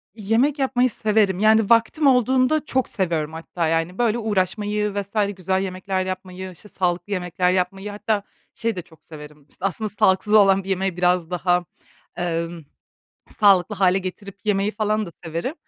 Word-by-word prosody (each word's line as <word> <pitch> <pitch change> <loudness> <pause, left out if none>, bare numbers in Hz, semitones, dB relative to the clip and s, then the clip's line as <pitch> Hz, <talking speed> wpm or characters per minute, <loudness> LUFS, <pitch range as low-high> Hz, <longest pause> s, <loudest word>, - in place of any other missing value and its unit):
Yemek 235 +7 +1
yapmayı 255 -1 +2
severim. 210 -4 +1
Yani, 220 0 +4
vaktim 235 +6 +3
olduğunda 260 +4 +3
çok 260 -3 0
seviyorum 165 -5 -2
hatta, 165 +1 -3
yani, 165 +3 -1
böyle, 235 -1 +1
uğraşmayı 210 0 -1
vs. 200 0 -5 0.2
güzel 190 +1 0
yemekler 185 0 -3
yapmayı, 185 0 -6
işte, 190 +4 -12
sağlıklı 180 +1 -2
yemekler 180 0 0
yapmayı, 195 +2 -2
hatta 210 0 -1 0.3
şeyi 230 -2 -2
de 180 - -4
çok 165 -2 -22
severim, 150 -2 -12
aslında 200 +3 -2
sağlıksız 195 0 +2
olan 195 -2 +5
bir 195 - -9
yemeği 190 -1 -1
biraz 180 -2 +1
daha, 180 0 +1 0.5
emm, 170 -1 -3 0.8
sağlıklı 200 0 +5
hâle 190 -1 +3
getirip 195 +1 -7
yemeyi 205 0 +1
falan 215 0 -1
da 170 - -8
severim. 165 - -3
195 Hz, 155 wpm, -22 LUFS, 180-215 Hz, 0.8 s, olan